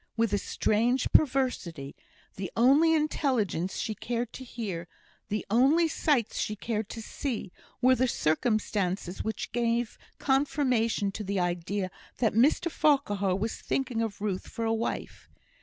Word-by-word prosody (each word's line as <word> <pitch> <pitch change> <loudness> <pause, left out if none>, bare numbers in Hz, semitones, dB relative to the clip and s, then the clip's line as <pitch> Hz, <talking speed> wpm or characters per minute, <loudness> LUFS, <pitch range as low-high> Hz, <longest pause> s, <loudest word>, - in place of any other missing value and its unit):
With 225 -2 +1
a 205 - +3
strange 235 +7 +1
perversity, 250 - +1 0.4
the 190 -2 -5
only 285 +7 +5
intelligence 250 - 0
she 220 - -2
cared 235 +2 -3
to 260 - -7
hear, 200 -9 -5 0.4
the 210 +1 -2
only 280 +9 +5
sights 285 -7 +1
she 210 - -1
cared 215 0 -3
to 225 - -6
see, 230 -6 -4 0.3
were 260 +1 +7
the 255 0 +2
circumstances 190 -1 0
which 220 - -4
gave 235 -1 0 0.2
confirmation 255 -7 +1
to 210 - -5
the 200 -1 -1
idea 180 +2 -1 0.3
that 225 -4 +2
Mr 285 - +3
Farquhar 205 -13 +2
was 215 +4 -2
thinking 255 -4 -1
of 220 -3 -3
Ruth 200 -3 -2
for 230 - -4
a 225 - +2
wife. 225 +1 -4
225 Hz, 140 wpm, -28 LUFS, 200-255 Hz, 0.4 s, were